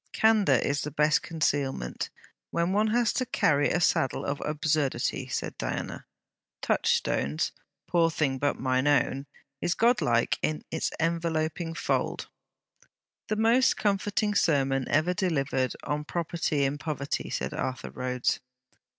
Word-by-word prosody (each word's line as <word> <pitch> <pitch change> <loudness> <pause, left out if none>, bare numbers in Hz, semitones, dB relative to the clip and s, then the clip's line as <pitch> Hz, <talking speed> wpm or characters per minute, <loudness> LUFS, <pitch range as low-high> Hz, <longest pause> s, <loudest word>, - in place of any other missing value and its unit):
'Candour 220 -2 +4
is 140 +1 0
the 150 - -3
best 150 +1 +3
concealment, 140 - -1 0.4
when 170 +2 0
one 210 +2 +3
has 235 +1 +2
to 255 - 0
carry 145 - +2
a 175 - +1
saddle 135 -5 +1
of 140 0 -2
absurdity,' 150 -2 0
said - - -3
Diana. - - -4 0.6
'Touchstone's 75 +3 +1 0.4
"poor 170 -2 +3
thing, 140 -5 0
but 145 +1 0
mine 130 +1 +1
own," 140 -1 +2 0.3
is 175 - 0
godlike 170 - +2
in 155 0 -1
its 160 - -1
enveloping 165 0 -1
fold.' - - -1 1.0
'The 215 - 0
most 230 +4 +4
comforting 205 +1 0
sermon 135 -8 +2
ever 155 +4 +2
delivered 140 -9 0
on 150 +1 -2
property 160 -2 -1
in 140 +2 -1
poverty,' 145 -3 -3
said - - -3
Arthur 130 0 -4
Rhodes. 125 -1 -1
155 Hz, 130 wpm, -28 LUFS, 140-175 Hz, 1.0 s, Candour